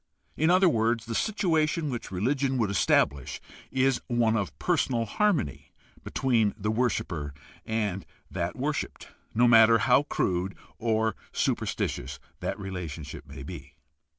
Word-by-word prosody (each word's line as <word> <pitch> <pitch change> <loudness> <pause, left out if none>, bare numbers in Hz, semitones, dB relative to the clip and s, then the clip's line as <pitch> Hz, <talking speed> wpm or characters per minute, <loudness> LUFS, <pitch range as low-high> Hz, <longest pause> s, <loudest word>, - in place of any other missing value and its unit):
In 160 +2 +2
other 185 +1 +5
words, 115 -5 +1
the 115 - -4
situation 160 - +1
which 120 - -5
religion 130 +8 0
would 110 -5 +1
estabhsh 70 -7 +2 0.3
is 130 0 +2
one 120 -2 +2
of 105 -3 -2
personal 130 -9 +1
harmony 150 - 0 0.3
between 115 -6 +1
the 105 0 -1
worshiper 85 - -1 0.3
and 105 -4 -1 0.3
that - - -2
worshiped, - - -3 0.3
no 120 +2 +5
matter 115 -1 +7
how 125 +4 +4
crude 95 -9 -1 0.2
or 110 -1 +1 0.2
superstitious 70 +3 -1 0.2
that - - -3
relationship 85 -6 -6
may 70 -1 -9
be. - - -9
115 Hz, 125 wpm, -28 LUFS, 95-130 Hz, 0.3 s, matter